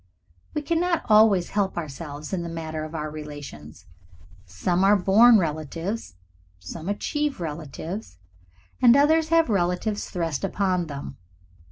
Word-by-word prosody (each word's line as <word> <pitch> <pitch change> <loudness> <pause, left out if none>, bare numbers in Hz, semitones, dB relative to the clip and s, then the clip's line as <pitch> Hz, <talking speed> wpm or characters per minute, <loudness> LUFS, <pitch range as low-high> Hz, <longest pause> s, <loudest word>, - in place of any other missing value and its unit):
We 300 - -1
cannot 335 +2 0
always 210 -4 +5
help 200 -3 -1
ourselves 150 0 -6
in 185 - -1
the 170 - -5
matter 160 -1 -5
of 155 +1 -9
our 155 -1 -4
relations. 145 - -9 0.6
Some 175 - 0
are 200 +2 +6
born 215 +5 +6
relatives, 165 - -3 0.4
some 155 - -7
achieve 295 +7 -2
relatives, 160 - -6 0.6
and 245 +1 +7
others 315 +3 +4
have 330 0 +4
relatives 195 +1 -1
thrust 165 -5 -3
upon 185 -3 0
them. 140 -2 -7
175 Hz, 130 wpm, -25 LUFS, 155-215 Hz, 0.6 s, and